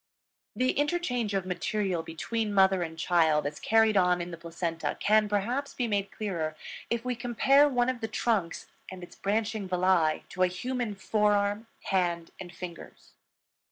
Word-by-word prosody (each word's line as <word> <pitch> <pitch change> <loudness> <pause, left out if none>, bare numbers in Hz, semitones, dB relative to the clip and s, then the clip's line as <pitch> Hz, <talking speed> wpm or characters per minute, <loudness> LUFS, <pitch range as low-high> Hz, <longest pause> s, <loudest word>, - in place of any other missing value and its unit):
The 255 +1 +2
interchange 275 -9 -1
of 190 -2 -1
material 185 0 -1
between 205 +7 -3
mother 190 -1 +4
and 160 -1 -4
child 160 -3 +2
as 145 +1 -4
carried 220 -1 +3
on 180 -2 +3
in 175 0 -5
the 170 - -7
placenta 170 0 -3
can, 215 0 +3
perhaps, 240 +8 -1
be 245 - -1
made 200 -2 -1
clearer 170 -7 -3 0.3
if 235 +1 -2
we 250 -1 -1
compare 265 +5 +4
one 245 -2 +1
of 255 -1 -1
the 225 - -2
trunks 215 -6 -1 0.2
and 185 -1 -9
its 175 - -12
branching 215 0 -1
villi 180 -3 +2
to 185 - -5
a 185 - +6
human 235 +4 -3
forearm, 205 +1 +1 0.2
hand, 175 -3 -1
and 180 -2 -8
fingers. 175 -2 -10
200 Hz, 160 wpm, -28 LUFS, 175-225 Hz, 0.3 s, a